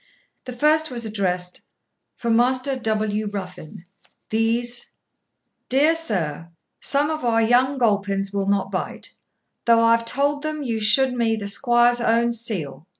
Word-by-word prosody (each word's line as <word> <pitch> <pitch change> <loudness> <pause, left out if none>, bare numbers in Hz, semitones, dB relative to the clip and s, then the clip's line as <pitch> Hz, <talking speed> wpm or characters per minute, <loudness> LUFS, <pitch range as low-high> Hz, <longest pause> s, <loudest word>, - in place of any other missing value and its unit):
The 250 - -6
first 305 +5 +2
was 240 -3 -3
addressed, 180 -4 -3 0.5
'For 235 - -2
Master 255 +3 +2
W. 215 -3 -1
Ruffin, 185 -4 -8 0.5
These.' 235 +2 -1 0.8
'Dear 285 +5 +4
sur, 175 - -2 0.3
sum 290 +2 0
of 310 -2 -4
our 225 -1 +2
yong 250 +4 +2
gulpins 200 -4 0
will 200 -1 -1
not 200 -1 0
bite, - - -5 0.5
thof 230 -1 +6
I 230 0 +5
tuold 280 +5 -1
them 310 -1 -4
you 230 -4 -2
shoed 235 +5 +4
me 230 -2 +1
the 205 -2 -5
squoire's 240 +2 +2
own 235 0 +2
seel. 195 - -5
230 Hz, 140 wpm, -22 LUFS, 205-255 Hz, 0.8 s, thof